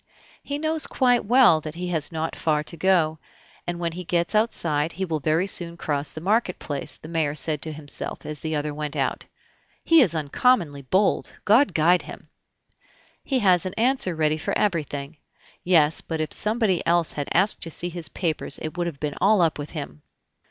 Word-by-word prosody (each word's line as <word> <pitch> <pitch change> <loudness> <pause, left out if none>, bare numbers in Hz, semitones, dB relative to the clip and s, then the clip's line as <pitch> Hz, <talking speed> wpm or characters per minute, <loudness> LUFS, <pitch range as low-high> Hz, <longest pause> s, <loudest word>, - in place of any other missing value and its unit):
"He 285 - -4
knows 315 +1 0
quite 245 -2 +2
well 235 -8 +5
that 155 +1 -7
he 180 +1 -4
has 160 -3 -1
not 160 0 -3
far 150 -2 0
to 170 - -6
go, 160 -3 +2 0.5
and 175 0 -2
when 170 -1 -1
he 180 +2 -7
gets 170 +2 -1
outside 170 -8 +1
he 190 +3 -3
will 160 -3 -2
very 155 +5 +1
soon 170 -3 -2
cross 145 -3 -1
the 155 - -7
marketplace," 180 -7 -1
said - - -10
the 155 - -8
mayor 155 -3 0
to 155 0 -1
himself, 150 -1 -7
as 150 -1 -5
the 160 -1 -3
other 150 0 -2
went 150 -1 -5
out. - - -1 0.6
"He 330 -1 +6
is 180 - +2
uncommonly 155 - +1
bold! 190 +9 +1
God 235 +8 +4
guide 170 +3 +4
him!... - - -11 0.9
He 270 - 0
has 180 -3 +4
an 185 - -7
answer 235 -6 +1
ready 155 0 +1
for - - -1
everything. 155 -6 -2 0.5
Yes, 160 -4 +3
but 160 -1 -4
if 155 - -2
somebody 215 -4 0
else 170 -1 +3
had 145 -1 -4
asked 190 +5 +2
to 165 - -5
see 175 +2 -3
his 175 -2 -5
papers 160 -5 -2
it 155 +1 -6
would 175 -1 -1
have 150 -5 -6
been 150 -1 -3
all 205 +2 +4
up 165 -3 +2
with 145 - -5
him!" 75 +1 -7
165 Hz, 195 wpm, -24 LUFS, 155-190 Hz, 0.9 s, He